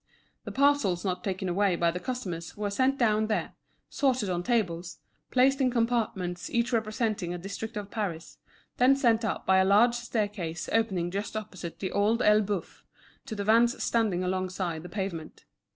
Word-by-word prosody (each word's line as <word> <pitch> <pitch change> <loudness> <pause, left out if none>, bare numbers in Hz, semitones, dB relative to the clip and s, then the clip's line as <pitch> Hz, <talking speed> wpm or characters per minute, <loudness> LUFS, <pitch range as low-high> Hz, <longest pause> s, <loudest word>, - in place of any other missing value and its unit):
The - - -5
parcels 265 -11 +2
not 180 -1 -2
taken 190 -1 -2
away 185 +1 +2
by 170 0 +2
the 180 - -4
customers 180 -10 -5
were 205 -1 -2
sent 260 +6 +2
down 215 -3 +2
there, 215 - -1 0.3
sorted 255 -8 0
on 175 -1 -1
tables, 180 -5 -1 0.3
placed 270 +2 +3
in 260 - +4
compartments 225 -7 -1
each 235 +1 0
representing 215 -5 -1
a - - -4
district 200 +5 -6
of 205 -1 -6
Paris; 180 -7 -4 0.4
then 255 +2 +5
sent 235 -4 +2
up 225 - -2
by 190 - +4
a 190 - +5
large 210 +5 +5
staircase 210 -8 -3
opening 190 -6 +1
just 205 +3 -3
opposite 185 -5 -7
The 190 - -4
Old 210 +3 +2
Elbeuf, 210 -3 +1 0.4
to 220 - -4
the 205 - -3
vans 230 +3 +3
standing 210 -6 +1
alongside 185 -2 -2
the 175 - -9
pavement. 175 -5 -5
205 Hz, 170 wpm, -28 LUFS, 180-230 Hz, 0.4 s, then